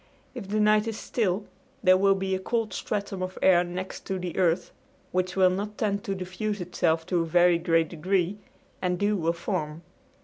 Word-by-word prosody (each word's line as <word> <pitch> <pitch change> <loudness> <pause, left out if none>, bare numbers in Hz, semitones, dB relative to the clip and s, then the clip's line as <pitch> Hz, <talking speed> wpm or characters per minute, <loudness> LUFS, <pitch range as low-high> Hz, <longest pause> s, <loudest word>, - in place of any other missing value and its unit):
If 240 -7 -7
the 210 +2 0
night 210 +1 +4
is 225 -1 -3
still 205 -3 -1 0.4
there 185 -1 +7
will 195 +1 +4
be 190 0 -2
a 190 - 0
cold 225 +3 -2
stratum 200 -2 -3
of 185 0 -4
air 180 -2 +6
next 180 +2 -6
to 190 - -1
the 180 -2 -5
earth, 175 -2 +1 0.4
which 185 0 -1
will 185 -1 +5
not 205 +3 -4
tend 200 -2 -1
to 195 -3 -2
diffuse 190 +3 -3
itself 165 -2 0
to 180 -1 +1
a - - -1
very 175 +1 +4
great 165 -2 +2
degree 185 +3 -1 0.4
and 180 -1 0
dew 205 +3 +1
will 165 -3 0
form. 170 -3 -4
185 Hz, 195 wpm, -27 LUFS, 175-200 Hz, 0.4 s, there